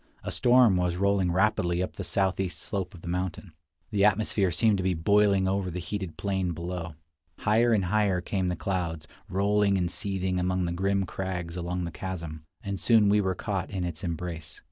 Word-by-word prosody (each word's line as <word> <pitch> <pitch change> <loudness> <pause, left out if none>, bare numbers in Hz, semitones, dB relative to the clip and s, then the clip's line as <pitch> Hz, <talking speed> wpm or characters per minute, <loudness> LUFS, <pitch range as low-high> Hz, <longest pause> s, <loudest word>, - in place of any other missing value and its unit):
A - - -4
storm 120 -5 +5
was 90 -1 0
rolling 100 -2 +2
rapidly 90 -2 +1
up - - -5
the - - -6
southeast 95 -2 0
slope 95 -4 -4
of 85 - -14
the - - -8
mountain. 90 0 -3 0.4
The 100 -1 +2
atmosphere 105 -1 +3
seemed 105 +4 +3
to 95 - -2
be 95 -1 +1
boiling 100 +2 +3
over 95 -1 0
the 90 - -5
heated 95 0 -5
plain 95 -3 -1
below. 85 0 -5 0.4
Higher 115 +3 +3
and 100 -4 +2
higher 100 -1 +2
came 95 +1 -2
the 90 - -1
clouds, 85 -4 -3 0.2
rolling 100 +1 +2
and 90 -1 0
seething 95 -3 0
among 90 0 0
the 85 - -2
grim 95 +2 0
crags 90 -3 -4
along 90 0 -3
the 85 - -4
chasm; 85 -5 -6 0.2
and 100 -1 -3
soon 110 -2 +4
we 105 +1 +4
were 95 -2 -1
caught 95 -1 -3
in 95 -2 -3
its 85 0 -5
embrace. 85 -2 -5
95 Hz, 190 wpm, -27 LUFS, 90-100 Hz, 0.4 s, storm